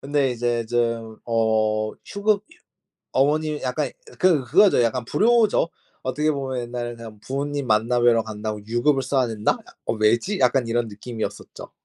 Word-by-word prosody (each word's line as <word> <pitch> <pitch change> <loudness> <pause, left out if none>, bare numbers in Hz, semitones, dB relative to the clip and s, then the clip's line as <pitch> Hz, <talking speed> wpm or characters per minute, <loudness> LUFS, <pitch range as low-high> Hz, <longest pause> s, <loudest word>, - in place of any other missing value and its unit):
근데 140 -1 +1
이제 120 -1 -1
좀 115 -2 -1
어 110 -2 +1
휴급 205 0 0
유 - - -19 0.6
어머님 150 +2 +1
약간 125 -1 -1 0.3
그 170 -7 +4
그거죠, 185 -2 +5
약간 120 +1 0
불효죠. 220 - +3 0.3
어떻게 150 +4 0
보면 130 -3 -3
옛날에 120 0 -5
그냥 110 -3 -11
부모님 140 +2 -3
만나 115 +3 +2
뵈러 120 -1 +4
간다고 105 -1 -5
유급을 135 +4 +2
써야 130 -2 +1
된다? 110 -2 0
약 - - -18
'어 - - +1
왜지?' 115 - +1
약간 125 -1 +3
이런 115 0 0
느낌이었었죠. 110 +2 -7
120 Hz, 325 characters per minute, -23 LUFS, 115-145 Hz, 0.6 s, 그거죠